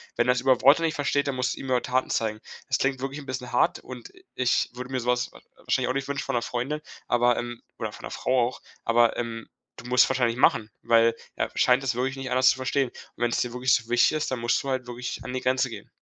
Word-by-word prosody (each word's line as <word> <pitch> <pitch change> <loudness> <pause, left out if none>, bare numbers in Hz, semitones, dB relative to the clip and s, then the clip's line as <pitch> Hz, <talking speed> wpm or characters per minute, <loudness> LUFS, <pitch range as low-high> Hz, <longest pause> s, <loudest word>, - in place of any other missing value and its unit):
Wenn - - +1
er's 125 0 +3
über 130 -2 +3
Worte 145 +4 +6
nicht 160 -1 +1
versteht, 145 0 0
dann 140 - 0
musst 130 0 0
du's - - -10
ihm - - -7
über 125 -1 +2
Taten 130 +1 0
zeigen. 110 -1 -1 0.3
Das - - +1
klingt 135 -1 0
wirklich 135 +2 -4
'n 145 - -10
bisschen 125 -2 -5
hart. 125 - +2
Und 125 -2 -10 0.2
ich 125 -1 +1
würde 125 +1 -7
mir 130 - -1
sowas 125 0 0
war - - -16 0.2
wahrscheinlich - - 0
auch 130 - -1
nicht 135 0 -2
wünschen 140 0 -2
von - - -2
'ner 120 - 0
Freundin. 135 +5 -3 0.3
Aber, 120 0 +3
ähm, 120 -1 -5 0.2
oder - - -3
von - - -13
der - - -6
Frau 125 -2 +1
auch. 125 - -8 0.2
Aber, 115 0 +3
ähm, 115 -1 -4 0.3
du 115 - -11
musst 125 0 +5
es - - 0
wahrscheinlich 120 -3 +1
machen, 110 -4 +3
weil 115 0 +4 0.2
er - - -1
scheint 125 +2 +3
es 130 -3 0
wirklich 130 +2 -1
nicht 135 -1 -5
anders 130 +1 +5
zu - - -4
verstehen. 130 0 0
Und - - -27 0.3
wenn's 120 -1 +1
dir 120 -1 -3
wirklich 125 +1 +2
so 115 0 +1
wichtig 120 0 +4
ist, 150 - -2
dann 130 - -2
musst 120 +1 +1
du 140 - -5
halt 130 -1 -1
wirklich 125 0 -5
an 125 - -6
die 130 - -2
Grenze 130 0 +1
gehen. - - -9
125 Hz, 265 wpm, -26 LUFS, 120-130 Hz, 0.3 s, Worte